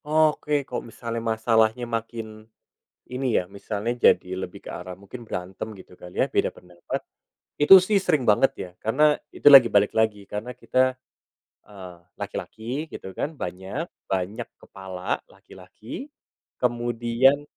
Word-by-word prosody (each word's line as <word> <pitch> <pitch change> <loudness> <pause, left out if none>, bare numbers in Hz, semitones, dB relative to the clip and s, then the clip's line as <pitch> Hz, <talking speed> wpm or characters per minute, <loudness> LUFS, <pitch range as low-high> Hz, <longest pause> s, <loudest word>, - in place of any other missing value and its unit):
Oke. 150 -2 +2
Kalo 125 - -4
misalnya 115 0 -5
masalahnya 110 +1 +2
makin 115 -2 -5 0.7
ini 130 +1 -3
ya, 90 - -2
misalnya 100 +4 -4 0.2
jadi - - -1
lebih - - -7
ke - - -5
arah 90 0 -8
mungkin 100 +5 -10
berantem, 95 0 -6
gitu 95 - -14
kali 90 0 -11
ya, - - +4
beda - - +1
pendapat, 90 -1 -7 0.6
itu 150 +6 +9
sih 200 +1 +2
sering 155 -8 +1
banget, 120 +4 +4
ya. 90 - -6
Karena, 120 +8 +1 0.3
itu - - -13
lagi 135 -4 +10
balik 100 -1 +3
lagi, 110 -2 +1
karena 110 +5 -6
kita, 130 0 +1 0.7
eee, 95 -4 -11 0.2
laki-laki, 125 +8 -5
gitu 95 - -8
kan, 150 - -3
banyak 95 - -5 0.2
banyak 95 +5 -2
kepala 95 -1 -5
laki-laki, 95 - -11 0.5
kemudian 120 +3 +2
115 Hz, 135 wpm, -25 LUFS, 100-130 Hz, 0.7 s, lagi